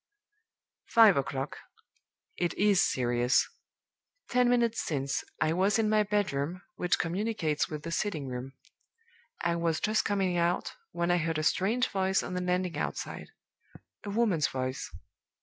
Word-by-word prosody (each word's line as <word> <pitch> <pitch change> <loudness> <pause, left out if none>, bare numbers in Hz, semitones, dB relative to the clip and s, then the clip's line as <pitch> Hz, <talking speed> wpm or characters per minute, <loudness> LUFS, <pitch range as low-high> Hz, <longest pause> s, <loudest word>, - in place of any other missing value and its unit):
"Five 225 -4 +7
o'clock. 135 0 -3 0.8
It 175 -1 -1
is 200 -1 +4
serious. 120 0 +2 0.8
Ten 250 0 +3
minutes 235 -2 +2
since, 140 -3 -2 0.2
I 155 - +2
was 195 +4 +2
in 220 -1 +2
my 215 0 +4
bedroom, 185 -5 -1
which 180 - +1
communicates 170 -4 -1
with 150 -1 -6
the 165 - -5
sitting 165 -5 -1
room. 130 +1 -6 0.9
I 170 0 +1
was 165 -2 0
just 215 0 +1
coming 190 -3 0
out, 170 +1 0 0.2
when 170 0 0
I 175 - +4
heard 165 -1 -1
a 155 - -1
strange 215 +10 +2
voice 190 -1 0
on - - -5
the 180 - -1
landing 180 -1 -1
outside - - -4 0.8
a 205 - -6
woman's 200 - +2
voice. 130 0 -4
180 Hz, 145 wpm, -29 LUFS, 155-205 Hz, 0.9 s, Five